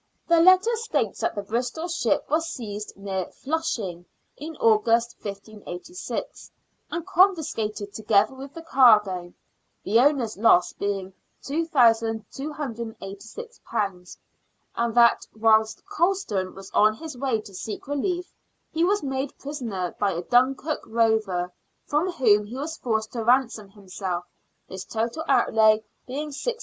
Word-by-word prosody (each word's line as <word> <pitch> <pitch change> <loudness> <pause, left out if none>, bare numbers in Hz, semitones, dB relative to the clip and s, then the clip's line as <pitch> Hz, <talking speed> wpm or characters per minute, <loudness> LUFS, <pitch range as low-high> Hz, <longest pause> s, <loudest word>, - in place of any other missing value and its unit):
Their 335 -1 +5
letter 370 +6 +6
states 460 +1 -1
that - - -1
the 205 - -3
Bristol 245 - -2
ship 345 0 0
was 325 +1 0
seized 215 -9 -6
near 190 -2 -3
Flushing 235 - -3 0.3
in 315 +3 -8
August, 230 +2 +3
1586, 205 - -7 0.4
and 340 -1 -4
confiscated, 310 - +1
together 215 +2 +2
with 270 +1 -9
the 330 - -8
cargo, 210 - +4 0.5
the 220 +4 +3
owner's 255 -6 +2
loss 195 -5 +4
being 195 -2 -3 0.3
£2,286; 230 - -2 0.6
and 235 -1 -1
that, 235 -1 +5
whilst 220 - +2
Colston 370 - -1
was 195 0 -11
on 215 +1 +4
his 315 +3 -8
way 250 -3 0
to 200 - -13
seek 210 +7 -6
relief, 350 +6 -2 0.4
he 325 - 0
was 405 +1 +2
made 270 0 -3
prisoner 230 -11 -4
by 200 -2 +1
a 170 +1 -4
Dunkirk 265 - +2
rover, 220 -6 +1 0.3
from 315 +6 0
whom 210 -7 +3
he 235 - -8
was 310 +4 -4
forced 220 -5 -2
to 230 -2 -3
ransom 235 -4 +2
himself, 190 -3 -5 0.4
his 190 0 -7
total 230 +8 -3
outlay 220 -4 +4 0.2
being 290 +4 -4
£600. 470 - -3
230 Hz, 130 wpm, -25 LUFS, 205-300 Hz, 0.6 s, letter